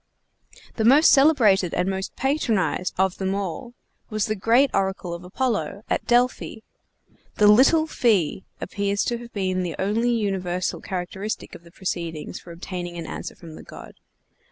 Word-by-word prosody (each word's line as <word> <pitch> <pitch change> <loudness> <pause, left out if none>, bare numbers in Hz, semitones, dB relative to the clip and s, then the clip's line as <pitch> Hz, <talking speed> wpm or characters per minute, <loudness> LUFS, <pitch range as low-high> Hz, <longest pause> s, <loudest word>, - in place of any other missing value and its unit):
The 220 - 0
most 275 +8 +6
celebrated 230 - +4
and 180 - 0
most 190 0 -3
patronized 235 - 0
of 190 0 +1
them 190 0 -1
all 200 +5 -5 0.3
was 215 -1 -1
the 215 - -1
great 235 +7 +3
oracle 190 -2 -1
of 170 +1 -7
Apollo, 210 +1 -2
at - - -1
Delphi. 245 -2 +1 0.7
The 210 - +3
"little 265 +10 +6
fee" 200 - +1 0.2
appears 200 +1 -1
to 240 -1 -1
have 235 0 -11
been 185 -2 -1
the 175 -3 -3
only 215 +5 0
universal 190 -6 -1
characteristic 190 +3 -5
of - - -11
the 170 - -16
proceedings 170 -3 -5
for 175 - -13
obtaining 175 0 -6
an 165 - -5
answer - - -6
from 165 -2 -12
the - - -10
god. - - -12
195 Hz, 155 wpm, -24 LUFS, 180-235 Hz, 0.7 s, most